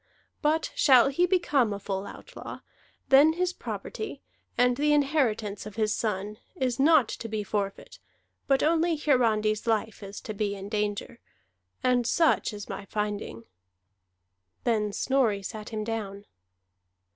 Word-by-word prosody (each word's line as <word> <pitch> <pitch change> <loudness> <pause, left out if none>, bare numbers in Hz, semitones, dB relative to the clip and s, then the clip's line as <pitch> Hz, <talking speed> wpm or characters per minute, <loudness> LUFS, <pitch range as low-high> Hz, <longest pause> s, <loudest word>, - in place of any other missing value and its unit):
But 315 +1 +1
shall 265 -2 +6
he 345 +6 +2
become 295 - +2
a 200 - -2
full 195 0 -4
outlaw, - - -9 0.5
then 290 +4 +7
his 360 +1 -1
property, 435 - -6 0.3
and 245 0 +4
the 295 +3 +2
inheritance 240 -9 0
of 210 - -10
his 215 -1 +1
son, 210 -1 -2 0.2
is 255 -2 -1
not 295 -3 +5
to 230 - -5
be 215 -1 -2
forfeit, 200 -1 -4 0.5
but 270 -1 +3
only 330 +1 +2
Hiarandi's 225 -7 +1
life 220 -1 0
is 200 0 -8
to 215 - -6
be 205 -1 -2
in 195 0 -8
danger. 210 +2 -2 0.6
And 245 -2 +2
such 325 +2 +2
is 205 -1 -8
my 200 0 -6
finding." 205 - -4 1.2
Then 215 -3 +1
Snorri 225 -4 +1
sat 215 +2 -6
him 215 -2 -3
down. 205 -3 -5
225 Hz, 140 wpm, -27 LUFS, 210-275 Hz, 1.2 s, then